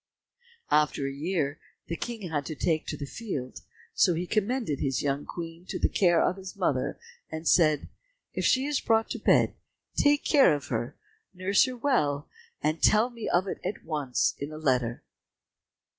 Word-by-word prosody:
After 150 Hz, -2 st, +2 dB
a 135 Hz, -, -2 dB
year 150 Hz, -1 st, -2 dB, 0.3 s
the 170 Hz, -, -4 dB
King 220 Hz, -2 st, -5 dB
had 145 Hz, -2 st, 0 dB
to 155 Hz, -, -4 dB
take 155 Hz, +1 st, 0 dB
the 145 Hz, -, -4 dB
field, 140 Hz, -, -5 dB, 0.3 s
so 180 Hz, -4 st, +4 dB
he 175 Hz, +2 st, -2 dB
commended 215 Hz, -, -1 dB
his 135 Hz, -2 st, -1 dB
young 140 Hz, 0 st, -1 dB
Queen 165 Hz, 0 st, -7 dB
to -, -, -3 dB
the -, -, +2 dB
care 175 Hz, -4 st, +3 dB
of 185 Hz, -, +1 dB
his 190 Hz, -1 st, -8 dB
mother -, -, 0 dB, 0.3 s
and 160 Hz, +1 st, -5 dB
said, 155 Hz, -4 st, +4 dB, 0.5 s
"If -, -, -2 dB
she 260 Hz, +1 st, +3 dB
is 290 Hz, -1 st, 0 dB
brought 225 Hz, -1 st, +2 dB
to -, -, -3 dB
bed -, -, +4 dB, 0.4 s
take 290 Hz, 0 st, +3 dB
care 275 Hz, -, +5 dB
of 145 Hz, -, -7 dB
her, 120 Hz, +3 st, -3 dB, 0.4 s
nurse 190 Hz, +5 st, +3 dB
her 255 Hz, -1 st, -5 dB
well, 150 Hz, -, +1 dB, 0.4 s
and 155 Hz, +2 st, 0 dB
tell 220 Hz, +4 st, +4 dB
me 230 Hz, -2 st, -5 dB
of 185 Hz, +3 st, +2 dB
it -, -, -4 dB
at 190 Hz, +3 st, -4 dB
once 150 Hz, -6 st, 0 dB
in 140 Hz, +2 st, -5 dB
a 155 Hz, -, -7 dB
letter." 125 Hz, -6 st, 0 dB
165 Hz, 175 wpm, -28 LUFS, 145-215 Hz, 0.5 s, care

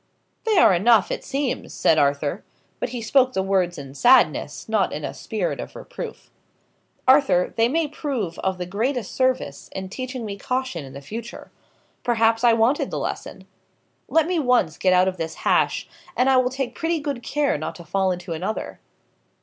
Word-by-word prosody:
"They 440 Hz, -3 st, +2 dB
are -, -, +7 dB
enough, 205 Hz, +3 st, +4 dB
it -, -, -3 dB
seems," 275 Hz, -2 st, -3 dB
said 160 Hz, -, +3 dB
Arthur. 145 Hz, +4 st, 0 dB, 0.4 s
But -, -, -2 dB
he 240 Hz, -1 st, -5 dB
spoke 255 Hz, +2 st, +3 dB
the 190 Hz, -, 0 dB
words 185 Hz, -2 st, +1 dB
in 135 Hz, -2 st, -8 dB
sadness, 245 Hz, -, +3 dB
not -, -, +1 dB
in -, -, -4 dB
a -, -, -5 dB
spirit -, -, -3 dB
of -, -, -7 dB
reproof. -, -, -8 dB, 0.8 s
"Arthur, 260 Hz, -10 st, +4 dB
they 230 Hz, 0 st, +3 dB
may 320 Hz, +3 st, +1 dB
prove 265 Hz, -, -4 dB
of 190 Hz, -1 st, -1 dB
the 180 Hz, -, -4 dB
greatest 225 Hz, +5 st, -2 dB
service, 260 Hz, 0 st, -1 dB
in 190 Hz, 0 st, -5 dB
teaching 255 Hz, +2 st, -5 dB
me 200 Hz, -1 st, -5 dB
caution 255 Hz, -, -2 dB
for -, -, -10 dB
the 140 Hz, +1 st, -9 dB
future. 225 Hz, -, -8 dB, 0.5 s
Perhaps 225 Hz, -1 st, +2 dB
I 235 Hz, -1 st, +6 dB
wanted 230 Hz, +5 st, +2 dB
the -, -, -4 dB
lesson. -, -, -5 dB, 0.6 s
Let 325 Hz, -1 st, +3 dB
me 350 Hz, 0 st, 0 dB
once 245 Hz, -, +2 dB
get 185 Hz, -, +3 dB
out 185 Hz, +1 st, +4 dB
of 185 Hz, -1 st, -2 dB
this 160 Hz, -1 st, -4 dB
hash, -, -, +2 dB, 0.3 s
and 260 Hz, +2 st, +4 dB
I 260 Hz, -, +5 dB
will 255 Hz, 0 st, +3 dB
take 260 Hz, -2 st, -3 dB
pretty 330 Hz, +4 st, -1 dB
good 285 Hz, -4 st, -4 dB
care 290 Hz, +3 st, 0 dB
not 160 Hz, +2 st, -5 dB
to 170 Hz, -, -10 dB
fall 190 Hz, +3 st, +1 dB
into 175 Hz, -1 st, -4 dB
another." 185 Hz, +7 st, -4 dB
230 Hz, 185 wpm, -23 LUFS, 180-260 Hz, 0.8 s, are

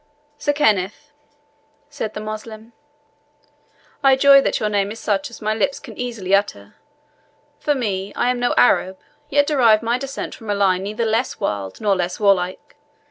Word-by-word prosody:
"Sir 290 Hz, -, +1 dB
Kenneth," 220 Hz, -1 st, 0 dB, 0.8 s
said 285 Hz, -7 st, -6 dB
the -, -, -4 dB
Moslem, 215 Hz, +1 st, -8 dB, 1.3 s
"I 270 Hz, -1 st, +6 dB
joy 275 Hz, +1 st, +7 dB
that -, -, -1 dB
your 215 Hz, -, 0 dB
name 205 Hz, -1 st, 0 dB
is 225 Hz, -, -8 dB
such 220 Hz, +7 st, -1 dB
as 235 Hz, -, -12 dB
my 215 Hz, +1 st, +1 dB
lips 265 Hz, +6 st, -1 dB
can 235 Hz, -6 st, -11 dB
easily 230 Hz, -6 st, -4 dB
utter. 195 Hz, -, 0 dB, 0.9 s
For 295 Hz, -, 0 dB
me, 200 Hz, -6 st, -3 dB
I 245 Hz, -, +1 dB
am 250 Hz, -, -3 dB
no 245 Hz, 0 st, 0 dB
Arab, 190 Hz, -6 st, +3 dB, 0.3 s
yet 285 Hz, +1 st, +3 dB
derive 235 Hz, -7 st, +3 dB
my 235 Hz, +2 st, 0 dB
descent 275 Hz, +1 st, -6 dB
from 225 Hz, -3 st, -11 dB
a 205 Hz, -, +1 dB
line 190 Hz, -2 st, +2 dB
neither 215 Hz, +4 st, -3 dB
less 225 Hz, +3 st, -1 dB
wild 100 Hz, -2 st, -3 dB
nor 205 Hz, -2 st, +1 dB
less 180 Hz, -1 st, -3 dB
warlike. 190 Hz, -3 st, 0 dB
220 Hz, 170 wpm, -20 LUFS, 200-250 Hz, 1.3 s, joy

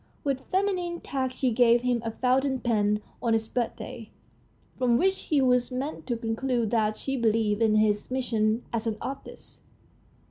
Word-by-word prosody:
With 270 Hz, -3 st, -2 dB
feminine 365 Hz, -3 st, 0 dB
tact 260 Hz, -2 st, -3 dB
she 255 Hz, -2 st, +1 dB
gave 240 Hz, +1 st, +4 dB
him 245 Hz, -2 st, +1 dB
a 225 Hz, -, -2 dB
fountain 260 Hz, +3 st, +1 dB
pen 210 Hz, -3 st, +1 dB, 0.2 s
on 230 Hz, -2 st, +1 dB
his 220 Hz, 0 st, 0 dB
birthday, 235 Hz, -2 st, -4 dB, 0.7 s
from 245 Hz, -2 st, +2 dB
which 380 Hz, +7 st, +1 dB
he 295 Hz, -3 st, +2 dB
was 250 Hz, -1 st, +3 dB
meant 270 Hz, +4 st, -4 dB
to 240 Hz, -3 st, -1 dB
conclude 230 Hz, 0 st, -1 dB
that 215 Hz, -2 st, +1 dB
she 270 Hz, -, -3 dB
believed 220 Hz, -3 st, +1 dB
in 220 Hz, -1 st, +4 dB
his 210 Hz, -1 st, +2 dB
mission 230 Hz, -3 st, 0 dB
as 230 Hz, 0 st, -1 dB
an 220 Hz, -1 st, -1 dB
artist. 270 Hz, +1 st, -8 dB
240 Hz, 165 wpm, -27 LUFS, 225-265 Hz, 0.7 s, gave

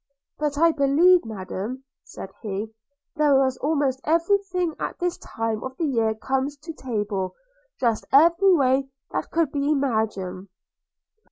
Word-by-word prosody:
'But 295 Hz, -1 st, -1 dB
I 335 Hz, +2 st, +5 dB
believe, 320 Hz, +5 st, +4 dB
Madam,' 215 Hz, +4 st, -5 dB, 0.2 s
said 195 Hz, -, -9 dB
he, 215 Hz, 0 st, -4 dB, 0.4 s
'there 295 Hz, -2 st, +4 dB
was 265 Hz, -1 st, +2 dB
almost 280 Hz, -3 st, 0 dB
every 335 Hz, +6 st, +3 dB
thing 365 Hz, -3 st, -2 dB
that -, -, -13 dB
at -, -, -39 dB
this 355 Hz, -1 st, -1 dB
time 225 Hz, -1 st, -3 dB
of 260 Hz, 0 st, -7 dB
the 330 Hz, -, 0 dB
year 225 Hz, -6 st, +1 dB
comes 265 Hz, +5 st, -2 dB
to 325 Hz, +3 st, -8 dB
table, 210 Hz, -8 st, -3 dB, 0.4 s
dressed 230 Hz, -3 st, 0 dB
every 340 Hz, +7 st, +6 dB
way 270 Hz, -4 st, +2 dB, 0.2 s
that -, -, -3 dB
could 325 Hz, -4 st, +1 dB
be 285 Hz, 0 st, -1 dB
imagined.' 220 Hz, -9 st, -1 dB
270 Hz, 150 wpm, -24 LUFS, 225-315 Hz, 0.4 s, every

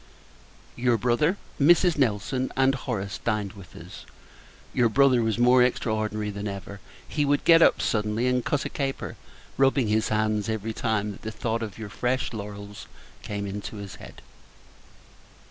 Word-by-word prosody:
Your 120 Hz, -1 st, +2 dB
brother, 125 Hz, -, +1 dB, 0.2 s
Mrs. 170 Hz, +3 st, +5 dB
Nelson, 130 Hz, 0 st, 0 dB
and 135 Hz, 0 st, +4 dB
Horace, 105 Hz, -7 st, -4 dB
dined 105 Hz, -4 st, -1 dB
with 100 Hz, -3 st, -14 dB
us. -, -, -11 dB, 0.7 s
Your 120 Hz, -2 st, +3 dB
brother 130 Hz, 0 st, +4 dB
was 110 Hz, -1 st, 0 dB
more 125 Hz, +1 st, +5 dB
extraordinary 110 Hz, -3 st, 0 dB
than 100 Hz, +1 st, -5 dB
ever. 100 Hz, 0 st, -7 dB, 0.3 s
He 150 Hz, -, -1 dB
would 145 Hz, 0 st, +1 dB
get 165 Hz, 0 st, +7 dB
up -, -, +4 dB
suddenly, 105 Hz, +2 st, 0 dB
and 125 Hz, -1 st, +1 dB
cut 145 Hz, -, -1 dB
a -, -, -2 dB
caper; 135 Hz, -2 st, -3 dB, 0.4 s
rubbing 135 Hz, -3 st, +3 dB
his 110 Hz, +1 st, +1 dB
hands 110 Hz, -1 st, 0 dB
every 110 Hz, 0 st, -3 dB
time 110 Hz, -2 st, -1 dB
that 100 Hz, -, -11 dB
the 110 Hz, -, -5 dB
thought 115 Hz, +1 st, -2 dB
of 105 Hz, -4 st, -6 dB
your 110 Hz, -2 st, -7 dB
fresh 125 Hz, +4 st, -1 dB
laurels 100 Hz, -1 st, -8 dB, 0.3 s
came 100 Hz, -1 st, -4 dB
into 100 Hz, +2 st, -6 dB
his 100 Hz, -2 st, -8 dB
head. -, -, -13 dB
110 Hz, 160 wpm, -26 LUFS, 105-130 Hz, 0.7 s, get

